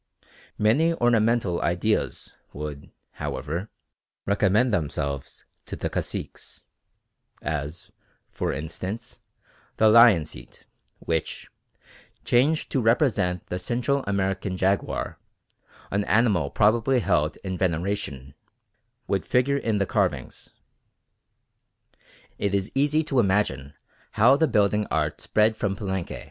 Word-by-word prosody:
Many 150 +11 +3
ornamental 115 - +2
ideas 90 +6 0 0.2
would, 75 0 -7 0.2
however, 85 +8 -4 0.6
recommend 105 +4 +2
themselves 70 -5 -3 0.2
to - - -6
the - - -4
caciques, - - -5 0.8
as, 75 +2 -4 0.4
for - - -2
instance, 100 - -6 0.6
the 110 - +5
lion 110 -7 +7
seat, - - -13 0.3
which, 80 -1 -3 0.7
changed 140 +6 +2
to 135 - +1
represent 110 - +1
the 90 - -4
Central 125 +7 -1
American 95 -1 -1
jaguar, 95 +2 -1 0.7
an 100 +1 +1
animal 100 -9 +2
probably 120 - +2
held 75 -6 +1
in 95 -1 -3
veneration, 85 -6 -2 0.7
would 95 -2 0
figure 135 +3 +2
in 115 -6 0
the 100 - +1
carvings. - - -2 1.9
It 100 -1 0
is 100 0 -1
easy 150 +3 +2
to 135 -4 0
imagine 95 - 0 0.4
how 120 +5 +5
the 160 +3 +2
building 105 -1 +2
art 75 -1 -1
spread 110 +1 +2
from 100 -2 -1
Palenque. 95 -4 -4
100 Hz, 105 wpm, -25 LUFS, 85-115 Hz, 1.9 s, lion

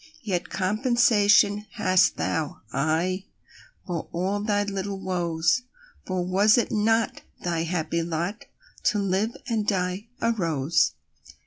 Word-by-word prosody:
Yet 180 -5 -2
compensation 210 -1 +3
hast 185 -1 +3
thou—aye!—For 160 - -3
all 190 +4 -1
thy 205 -1 +1
little 195 -1 -4
woes; 175 +2 0 0.5
For 185 -1 -1
was 200 +5 +4
it 240 - +1
not 225 +1 +1 0.2
thy 170 -2 -1
happy 170 -1 -1
lotTo 180 - -4
live 200 +3 0
and 220 -4 -1
die 185 +2 -1
a 230 - +2
rose? 160 - +1
190 Hz, 105 wpm, -25 LUFS, 170-210 Hz, 0.5 s, was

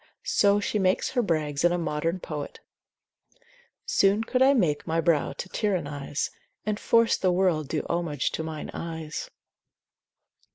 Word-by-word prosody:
So 205 0 +3
she 210 +1 -1
makes 190 +6 +1
her 255 -2 +2
brags 155 -7 -1
in 175 - +5
a 175 - +1
modern 165 +1 -1
poet, 150 -4 -6 1.3
Soon 200 +3 +3
could 255 +3 -1
I 275 +2 +6
make 165 - +1
my 165 +1 +1
brow 165 -2 +2
to - - -6
tyrannise, 150 -8 -2 0.3
And 210 0 -1
force 230 0 +4
the 185 - +2
world 175 -5 +1
do 155 +2 -2
homage 170 -5 -1
to - - -3
mine 160 -1 -5
eyes. 160 -2 -5
170 Hz, 150 wpm, -26 LUFS, 155-200 Hz, 1.3 s, I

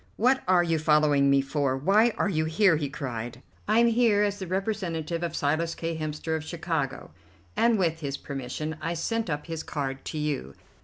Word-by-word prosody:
"What 255 +4 +3
are 180 -1 +5
you 165 -2 +1
following 150 -2 +4
me 140 0 +5
for? 135 -1 -1
Why 200 - +4
are - - +1
you 155 -5 0
here?" 165 +3 +4
he 150 -2 -2
cried. 120 -3 -5 0.2
"I 215 +2 +3
am 235 - +6
here 230 -3 +3
as 205 0 -1
the 190 - -5
representative 175 -4 -2
of 170 -1 -3
Silas 160 +3 0
K. 165 0 -3
Hemster, 155 +1 -3
of 160 - -3
Chicago, 160 - -3 0.4
and 230 -1 +3
with 165 -4 0
his 140 -2 -3
permission 140 +4 -5
I 170 +1 -2
sent 225 +5 -2
up 150 -1 -3
his 165 -2 -4
card 135 -2 -4
to 155 - -4
you." 145 - -3
160 Hz, 195 wpm, -27 LUFS, 145-190 Hz, 0.4 s, am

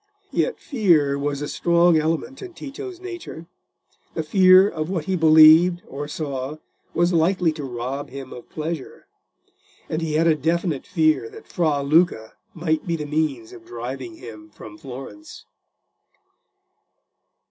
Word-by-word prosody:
Yet - - -1
fear 170 - +2
was 145 0 -2
a - - -3
strong 170 +1 +3
element 165 - -2
in 370 -3 -9
Tito's 360 +6 -8
nature—the 255 - -10
fear 185 +3 +6
of 155 -4 -4
what 175 -5 -3
he 190 - -1
believed 160 +2 +6
or 145 +2 -6
saw 140 -2 -4 0.4
was 175 +2 +2
likely 170 +1 +2
to 155 -1 -7
rob 130 +2 -5
him 135 0 -9
of 120 - -12
pleasure: 155 -2 -6 0.8
and 155 - -3
he 160 -2 -2
had 160 +2 +3
a 165 - +5
definite 160 0 -1
fear 160 - +1
that 445 0 -13
Fra 155 -5 0
Luca 145 -7 +2 0.2
might 160 -1 -1
be 170 - 0
the 150 -2 -5
means 145 -7 -2
of 115 -2 -13
driving 120 0 -7
him 110 -2 -11
from 105 0 -12
Florence. 135 - -10
155 Hz, 140 wpm, -22 LUFS, 140-175 Hz, 0.8 s, fear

